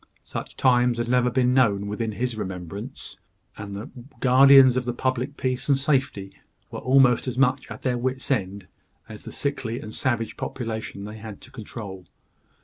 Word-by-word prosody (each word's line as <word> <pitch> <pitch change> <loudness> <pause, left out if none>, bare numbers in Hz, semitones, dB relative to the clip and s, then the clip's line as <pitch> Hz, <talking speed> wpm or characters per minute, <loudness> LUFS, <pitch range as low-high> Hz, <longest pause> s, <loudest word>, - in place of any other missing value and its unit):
Such - - -7
times 125 -2 +3
had 120 0 -2
never 125 0 +3
been 125 +1 +2
known 105 -6 +3
within 110 +2 -3
his 120 +2 -2
remembrance; 100 +4 -7 0.4
and 100 -1 -7
the 105 +6 -7 0.3
guardians 130 0 +7
of 130 -1 -1
the 120 -1 -2
public 130 +3 -2
peace 130 +1 -2
and 140 - +5
safety 130 - -1 0.3
were - - -5
almost 130 -1 +4
as 125 -1 -3
much 130 0 +2
at - - -9
their 125 -2 0
wits' 130 +2 -2
end 100 -5 -1 0.4
as 110 -1 -11
the - - -7
sickly 130 -5 -3
and 110 - -9
savage 115 -4 -1
population 110 -4 -5
they 105 +1 -8
had 110 -2 -9
to - - -15
control. 100 -6 -8
120 Hz, 170 wpm, -24 LUFS, 105-130 Hz, 0.4 s, guardians